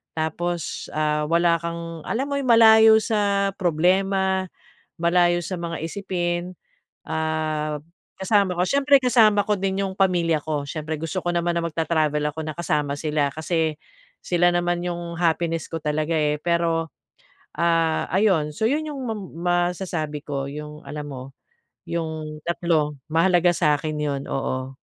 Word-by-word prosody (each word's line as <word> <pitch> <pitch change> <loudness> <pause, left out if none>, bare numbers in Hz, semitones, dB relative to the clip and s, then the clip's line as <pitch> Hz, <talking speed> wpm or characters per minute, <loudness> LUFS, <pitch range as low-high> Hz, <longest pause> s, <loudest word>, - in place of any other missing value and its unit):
Tapos, 165 +2 -3
ah, 150 0 +1
wala 170 0 +3
kang, 170 -1 -5
alam 250 +4 -1
mo 280 - -1
yung 270 - -3
malayo 220 -1 +8
sa 200 -3 +1
problema, 190 +3 +2 0.5
malayo 175 0 +3
sa 185 - -4
mga 170 -1 -4
isipin. 175 -1 -3 0.5
Ah, 155 -1 -2 0.4
kasama 195 -1 +2
ko 180 - +2
siyempre 280 0 +5
kasama 220 -4 +5
ko 210 - +1
din 195 0 -1
'yong 190 -1 -4
pamilya 175 -5 +2
ko. 150 -2 -1
Siyempre 155 +1 -4
gusto 165 +3 -2
ko 175 - +1
naman 170 0 0
na 170 - -1
magta-travel 155 -2 0
ako 160 - -7
na 155 - -4
kasama 150 -4 0
sila. 150 -2 0
Kasi, 160 0 -1 0.5
sila 175 0 +3
naman 175 0 0
'yong 170 -1 -4
happiness 165 -1 0
ko 165 - -3
talaga 155 +2 0
eh. 150 -1 +1
Pero, 165 -2 0 0.6
ah, 165 -1 +2
ayon! 185 -7 +2
So 220 - -1
'yon 305 +3 0
'yong 280 -3 -5
mam 220 -3 -3 0.2
masasabi 175 -4 -1
ko 140 -2 -3
'yong 150 +1 -8
alam 150 -1 -6
mo, 130 -2 -7 0.7
'yong 155 -2 -4
3, 160 -4 0
mahalaga 175 +1 +4
sa'kin 155 -1 +1
'yon, 140 -2 -2
oo. 130 0 -3
170 Hz, 145 wpm, -23 LUFS, 155-185 Hz, 0.7 s, malayo